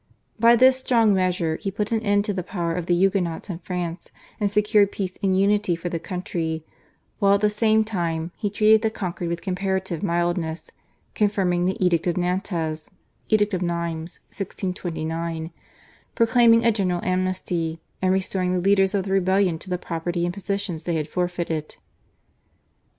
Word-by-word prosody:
By 235 +1 +7
this 260 +2 +6
strong 230 -5 +3
measure 180 -4 +1
he 200 - -4
put 205 +2 -3
an 225 -1 +1
end 205 -1 +2
to 210 - -1
the 185 - -2
power 175 -3 -3
of 175 0 -3
the 175 - +3
Huguenots 185 -1 0
in 170 - -6
France 175 -2 -5 0.3
and 205 -2 +1
secured 210 0 +3
peace 185 -2 -4
and 190 -2 +2
unity 205 -2 +2
for 170 +1 -5
the 170 - -3
country, 165 -3 -4 0.5
while 200 -1 +5
at 200 - -1
the 210 0 +3
same 220 +1 +3
time 170 -5 -2
he 205 - -2
treated 215 +1 +4
the 220 - +1
conquered 180 -5 -4
with 170 0 -4
comparative 190 -2 -2
mildness, 175 -2 -1 0.4
confirming 185 -4 +1
the 190 - -1
Edict 180 -2 +2
of 175 - 0
Nantes 175 -4 -2 0.4
(Edict 210 -1 +2
of 185 - -1
Nimes, 170 -1 -3
1629), 165 -4 -4 0.6
proclaiming 230 0 +5
a 230 - +6
general 185 -5 0
amnesty, 185 -3 -1 0.2
and 185 0 +2
restoring 185 -1 0
the 180 - +1
leaders 195 +1 +3
of 195 - +1
the 195 - -4
rebellion 190 -2 +2
to 185 - -11
the 180 - 0
property 170 0 -3
and 175 - -2
positions 200 -3 -3
they 170 0 -2
had 155 -2 -1
forfeited. 170 -3 -3
185 Hz, 165 wpm, -23 LUFS, 170-205 Hz, 0.6 s, By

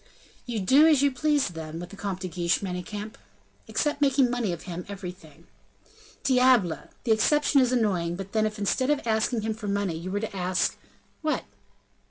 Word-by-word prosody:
"You 235 -3 -2
do 270 +11 +6
as 295 -4 +4
you 285 - +4
please, 290 0 +1
then, 160 -1 -7
with 175 +1 -7
the - - -9
Comte 195 -2 -4
de 185 - -3
Guiche, 175 -1 0
Manicamp?" 205 +4 -5 0.5
"Except 295 -1 -1
making 270 -3 +3
money 240 -6 -1
of 170 -2 -6
him 180 -1 -6
everything?" 180 -5 -9 0.8
"Diable! 250 -9 +3
the 235 - 0
exception 285 +5 +4
is 250 -1 +2
annoying; 190 -8 +1
but 195 +1 -7
then, 215 -1 +2
if 215 0 -6
instead 235 +6 0
of 295 -3 +1
asking 220 +1 +1
him 220 0 -1
for 215 -1 -7
money, 200 -3 0
you 170 +3 -6
were 200 +2 -1
to 215 -1 -5
ask 185 0 0 0.2
" - - -38
"What?" 310 -1 0
210 Hz, 190 wpm, -26 LUFS, 180-255 Hz, 0.8 s, do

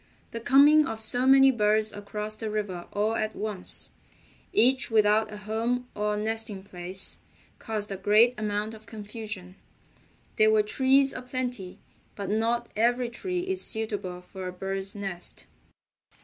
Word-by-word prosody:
The 230 - -4
coming 285 +5 +5
of 225 - -5
so 245 +3 +3
many 270 0 +7
birds 215 -2 +1
across 210 +1 -5
the 220 0 -5
river 205 -5 -4
all 215 +2 0
at 215 -1 -2
once, 210 -4 -4 0.6
each 260 +2 +4
without 215 0 +3
a 210 - -7
home 230 +4 -2
or 210 0 -1
nesting 220 -2 -2
place, 185 0 -2 0.4
caused 210 -2 -4
a 195 - -4
great 210 +5 +4
amount 210 0 -3
of 220 0 -14
confusion. 210 -3 -7 0.8
There 215 0 +5
were 215 -1 +3
trees 265 +5 +4
aplenty, 250 -6 -4 0.4
but 200 -1 -5
not 230 +2 0
every 240 +2 +1
tree 360 +9 -3
is 375 +1 -1
suitable 205 -5 -1
for 185 0 -8
a - - -4
bird's 195 +2 -4
nest. 195 -3 -4
215 Hz, 145 wpm, -27 LUFS, 205-240 Hz, 0.8 s, many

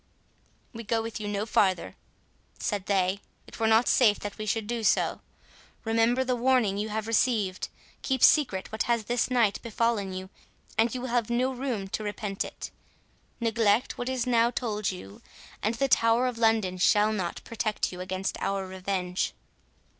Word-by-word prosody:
"We 230 0 -7
go 225 +1 0
with 225 -1 -5
you 210 - -4
no 205 0 -2
farther," 190 -4 +1 0.6
said 205 -3 -3
they; 195 0 +1 0.2
"it - - -12
were 225 - +2
not 225 +2 +4
safe 215 -5 +4
that 205 0 -6
we 215 - -4
should 220 0 0
do 230 +1 -3
so.—Remember 230 +3 -1
the 255 -1 0
warning 240 -5 +2
you 215 +1 -2
have 215 0 -3
received—keep 230 +3 -1
secret 220 -11 +4
what 220 - -3
has 235 -2 +2
this 240 +3 0
night 235 -5 +2
befallen 230 -3 -1
you, 185 +1 -7 0.4
and 225 +1 +3
you 250 - -3
will 255 - -4
have 235 -2 0
no 250 +2 +1
room 245 -6 -3
to 215 - -3
repent 205 -1 -3
it—neglect 225 -1 -3
what 245 +1 -2
is 255 -2 -1
now 235 -1 +3
told 215 -5 -2
you, 100 - -8 0.4
and 220 +3 0
the 275 +3 +1
Tower 230 0 +3
of 250 -2 -2
London 220 -5 +2
shall 210 +4 +4
not 185 -5 -3
protect 220 -2 -2
you 180 0 -7
against 185 +1 -3
our 195 -1 -1
revenge." 185 -1 -2
220 Hz, 165 wpm, -27 LUFS, 200-235 Hz, 0.6 s, not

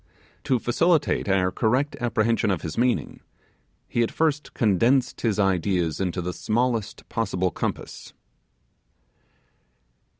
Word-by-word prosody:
To 130 - +2
facilitate 150 - +1
our 95 -1 +2
correct 130 +8 0
apprehension 115 -2 +1
of 95 -5 -1
his 80 - -4
meaning, 125 +1 0 0.7
he 120 - 0
at 115 - +1
first 150 -2 -1
condensed 120 +4 +2
his 110 -4 0
ideas 90 -3 +1
into 90 -1 -2
the 90 +1 -3
smallest 115 0 -1
possible 95 -5 -1
compass. - - -5
110 Hz, 110 wpm, -24 LUFS, 95-125 Hz, 0.7 s, To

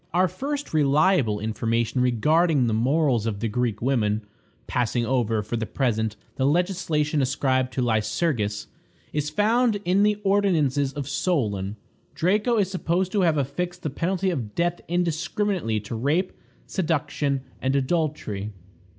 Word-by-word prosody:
Our 185 +1 +4
first 285 - -4
reliable 145 - +3
information 115 +3 -1
regarding 145 +4 +3
the 115 - 0
morals 125 0 +2
of 105 -3 -2
the 115 - -1
Greek 115 -1 -1
women, 110 -5 +1 0.4
passing 120 -1 0
over, 115 -4 +1
for 110 +3 -3
the 110 -1 -3
present, 110 -5 0 0.2
the 130 - +1
legislation 155 -3 +1
ascribed 130 -1 +1
to 130 - 0
Lycurgus, 110 -1 0 0.5
is 150 0 -1
found 220 +5 +2
in 185 +3 +3
the 210 0 +3
ordinances 160 -9 +2
of 140 -3 -5
Solon. 110 - -1 0.4
Draco 210 +7 +2
is 195 -3 +1
supposed 185 0 0
to 205 - +1
have 165 -4 +3
affixed 175 +6 -3
the 150 - -2
penalty 185 +5 0
of 115 -11 -4
death 175 0 0
indiscriminately 175 - 0
to 105 +3 -7
rape, 150 +11 0 0.3
seduction, 145 -5 -1 0.2
and 130 +1 +1
adultery. 135 - -1
145 Hz, 140 wpm, -25 LUFS, 115-175 Hz, 0.5 s, Our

